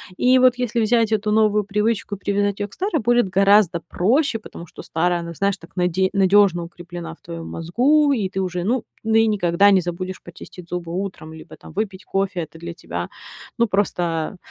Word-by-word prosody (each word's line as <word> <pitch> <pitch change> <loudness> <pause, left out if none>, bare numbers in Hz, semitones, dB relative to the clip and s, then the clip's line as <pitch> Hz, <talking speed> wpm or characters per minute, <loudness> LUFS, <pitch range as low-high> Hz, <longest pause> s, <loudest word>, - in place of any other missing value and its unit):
И 255 +5 +4
вот 255 -1 +5
если 240 -2 -1
взять 225 0 +2
эту 215 -1 0
новую 210 -1 +3
привычку 210 +1 -1
и - - -12
привязать 205 +1 -1
её 205 - -3
к - - -19
старой, 365 -6 -1
будет 240 -1 +3
гораздо 195 -2 +3
проще, 235 - +1
потому 175 -5 -11
что - - -11
старая, 175 +2 0
она, 170 0 -6
знаешь, 195 +3 0
так 165 - -17
наде 180 +1 +1
надёжно 195 -2 +4
укреплена 170 -1 -8
в - - -19
твоём 165 -1 -8
мозгу, 275 - +2
и 210 -7 -1
ты 190 - -4
уже, 180 -2 -2
ну, 235 +5 0 0.2
ну 220 0 0
и 225 0 +5
никогда 200 -1 +3
не 190 -2 +4
забудешь 185 +2 -5
почистить 175 0 -12
зубы 175 -1 -5
утром 180 -4 -5
либо 160 - -12
там - - -14
выпить 195 -2 -4
кофе. 195 -2 -1
Это 160 0 -9
для 170 +1 -7
тебя, 85 - -6 0.5
ну, 235 -1 +3
просто, 175 -4 -1
195 Hz, 200 wpm, -21 LUFS, 175-215 Hz, 0.5 s, вот